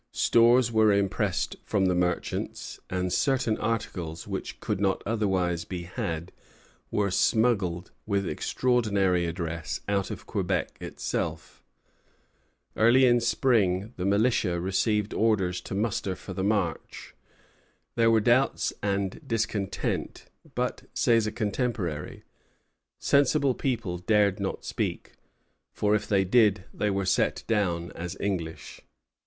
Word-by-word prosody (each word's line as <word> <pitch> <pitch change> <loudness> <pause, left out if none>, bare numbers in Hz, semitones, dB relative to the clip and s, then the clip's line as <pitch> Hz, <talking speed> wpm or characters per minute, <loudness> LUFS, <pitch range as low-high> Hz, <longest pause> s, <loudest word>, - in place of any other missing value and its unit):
Stores 120 +1 +4
were 110 -1 +4
impressed 100 -2 0
from 100 -3 +1
the 90 - +2
merchants; 90 0 -2
and 90 -1 -1
certain 130 -5 +1
articles, 90 -8 -3
which - - -5
could 95 - -2
not 95 -1 +1
otherwise 95 -6 0
be 90 -2 -6
had, 85 0 -4 0.6
were 100 -2 0
smuggled, 100 -6 +1 0.2
with 100 -2 0
extraordinary 100 -8 +1
address, 85 -2 -4
out 100 -1 0
of - - -7
Quebec - - -2
itself. - - -4 1.1
Early 120 +4 +5
in 120 -1 +5
spring 115 -4 +1
the 90 - -3
militia 100 -3 +2
received 105 +3 0
orders 95 -5 +1
to - - -6
muster 100 -2 -1
for 95 - -9
the 95 - -3
march. 100 -6 -2 0.8
There 115 -1 +4
were 110 -1 +4
doubts 125 +4 +2
and 100 - -1
discontent; 110 -5 -2 0.3
but, - - -1
says 115 -2 +3
a - - -2
contemporary, 105 - -3 0.7
"sensible 140 -1 +3
people 115 -10 -2
dared 105 +1 +2
not 95 -1 -3
speak, - - -3 0.6
for 105 0 +1
if 105 - 0
they 95 -2 +2
did 105 -2 +3
they 105 - 0
were 100 -1 -1
set 95 - +1
down 85 -6 0
as 90 +1 -6
English." 85 -5 -4
100 Hz, 125 wpm, -27 LUFS, 90-115 Hz, 1.1 s, Early